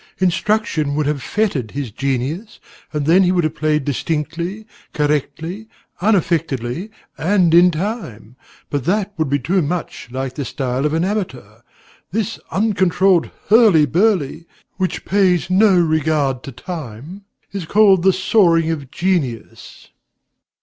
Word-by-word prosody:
Instruction 185 -5 0
would 150 0 0
have 145 -1 -1
fettered 175 - -1
his 135 -3 -5
genius, 135 - -3 0.3
and 150 -2 -2
then 170 +5 +5
he 180 -1 +3
would 180 -2 +1
have 155 - -1
played 150 -2 0
distinctly, 170 - -3 0.3
correctly, 160 +7 -2 0.3
unaffectedly, 165 - 0 0.3
and 180 -1 +2
in 175 +1 +7
time; 155 - -5 0.4
but 140 -3 -2
that 205 +3 0
would 160 -4 -1
be 140 - +2
too 175 +8 0
much 165 -5 -4
like 130 +1 -4
the 140 - -4
style 130 +3 -2
of 150 - -2
an 165 +2 +1
amateur. 130 - -4 0.5
This 210 +1 -2
uncontrolled 190 -3 +2 0.2
hurly 210 -8 +6
burly, 170 - 0 0.3
which 185 -2 -2
pays 185 -3 +2
no 195 0 +5
regard 155 -5 +1
to 135 - -7
time, 155 - -8 0.3
is 195 -4 -5
called 200 -1 +5
the 190 +2 +5
soaring 175 -3 +3
of 145 -5 -5
genius. 160 - -3
165 Hz, 135 wpm, -19 LUFS, 145-190 Hz, 0.5 s, in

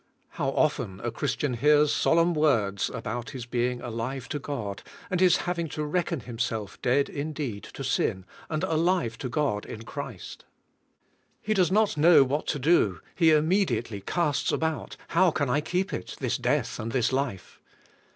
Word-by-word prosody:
How 135 - -2
often 125 -10 0
a 120 - -2
Christian 135 +1 -1
hears 150 +4 +4
solemn 170 +1 +3
words 115 -11 +2
about 120 +4 -5
his 130 -5 -7
being 125 0 -1
alive 120 +2 -4
to 145 - -2
God, 115 -9 -5 0.3
and 180 - +1
his 180 -2 +5
having 170 -2 -2
to 155 - -3
reckon 170 -1 -1
himself 115 -4 -4
dead 135 +3 +2
indeed 140 -7 -4
to - - -5
sin, 95 0 0 0.2
and 155 +1 -2
alive 165 -8 +1
to 130 - -4
God 120 -6 0
in 110 - -8
Christ! 125 - -7 1.0
He 215 - -1
does 185 -4 +2
not 210 -3 +2
know 160 -1 +7
what 140 +3 -2
to 145 - 0
do; 125 - +3
he 165 -2 +4
immediately 150 - +2
casts 150 - 0
about: 160 -1 -2
"How 180 +2 +4
can 145 -5 -1
I 145 - +2
keep 185 +4 -1
it, 90 - -5
this - - -1
death - - 0
and 115 +1 -4
this 130 -1 +1
life?" 130 -9 -3
140 Hz, 165 wpm, -27 LUFS, 115-160 Hz, 1.0 s, know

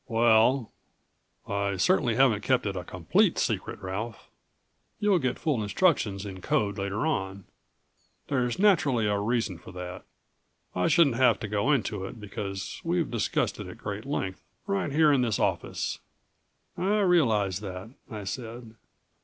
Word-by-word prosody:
"Well 115 +1 +3 0.8
I 100 -1 -1
certainly 105 +6 +2
haven't 125 -5 +4
kept 125 +2 +1
it 100 -1 -2
a 90 - -4
complete 90 -3 +1
secret, - - -1
Ralph. 105 +5 -5 0.7
You'll 205 -3 +3
get 130 -4 -1
full 145 -8 0
instructions 105 - +1
in 95 -2 -7
code 100 +2 0
later 100 +7 -2
on. 95 -10 -2 0.8
There's 125 -3 0
naturally 150 - +3
a 105 -1 +1
reason 105 -4 -1
for 90 - -12
that. 90 0 -7 0.7
I 90 0 +1
shouldn't 150 -9 +4
have 120 -5 +4
to 105 - -3
go 105 +7 +1
into 110 -8 0
it, 110 - -8
because 100 -1 -6
we've 170 -1 0
discussed 115 -3 -1
it - - -6
at - - -9
great - - -5
length 95 0 -3 0.2
right 195 -6 -1
here 155 +1 +5
in 135 - +3
this 115 -5 +1
office." - - -1 0.8
"I 205 +3 +1
realize 110 - +3
that," 95 +1 -7 0.2
I 105 -2 -6
said. 115 +3 -6
110 Hz, 150 wpm, -27 LUFS, 100-135 Hz, 0.8 s, here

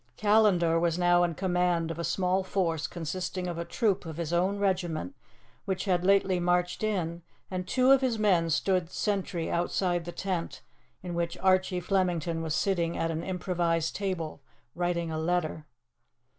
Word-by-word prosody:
Callandar 205 -6 +4
was 170 0 +1
now 175 0 +4
in 170 -2 0
command 180 -2 0
of 165 - -6
a - - -2
small 185 +2 +1
force 170 -5 -1
consisting 180 +2 -4
of 170 -1 -4
a - - -1
troop 200 -2 0
of 160 -2 -7
his 170 -1 -3
own 185 +4 +1
regiment 185 - -1 0.5
which 190 -1 -2
had 180 -3 +1
lately 195 -1 +3
marched 180 0 +1
in, 175 -6 -1 0.3
and 185 -1 -3
two 255 +6 +3
of 275 -1 +6
his 250 -4 0
men 185 -6 +2
stood 180 +1 +1
sentry 190 -5 -2
outside 175 0 0
the 175 - -5
tent 180 -2 -4 0.4
in 175 -1 -5
which 170 0 -2
Archie 185 -1 +2
Flemington 175 -3 0
was 160 -1 -2
sitting 170 -4 0
at 165 - 0
an 160 0 -3
improvised 175 -3 -1
table 185 -7 -3 0.3
writing 175 -1 -1
a 155 - -2
letter. 160 -2 -1
180 Hz, 165 wpm, -28 LUFS, 170-190 Hz, 0.5 s, of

